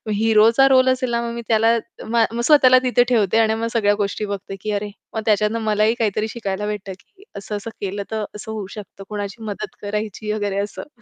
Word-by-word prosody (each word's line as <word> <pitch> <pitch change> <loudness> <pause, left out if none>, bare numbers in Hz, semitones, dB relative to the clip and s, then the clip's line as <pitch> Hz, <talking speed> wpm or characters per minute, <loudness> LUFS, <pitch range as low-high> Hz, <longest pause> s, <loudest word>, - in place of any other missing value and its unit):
हिरोचा 225 +4 +5
role 260 -1 +5
असेल 255 -1 0
ना, 235 0 0
मग 235 0 -4
मी 235 - -4
त्याला 225 +1 +3 0.3
मग 230 0 +2
मग 235 - -2
स्वतःला 260 -4 +7
तिथे 245 -1 +3
ठेवते 220 -4 +2
आणि 220 -1 +3
मग 230 +1 -2
सगळ्या 205 -3 +3
गोष्टी 205 +1 -2
बघते, 200 -1 -5
की 215 - -3
अरे. 205 0 -2 0.2
मग 220 - -2
त्याच्यातनं 215 +1 +2
मलाही 215 +1 +2
काहीतरी 215 0 0
शिकायला 210 -3 -4
भेटतं, 205 -2 -4
की 400 0 -23
असं-असं 205 +2 -5
केलं 200 +1 -3
तर 220 -1 -2
असं 220 +1 -7
होऊ 215 -3 -5
शकतं, 195 -1 -10
कोणाची 205 +1 -5
मदत 215 0 -6
करायची 210 +1 -4
वगैरे 205 -2 -2
असं. 205 +6 -5
215 Hz, 200 wpm, -21 LUFS, 205-230 Hz, 0.3 s, स्वतःला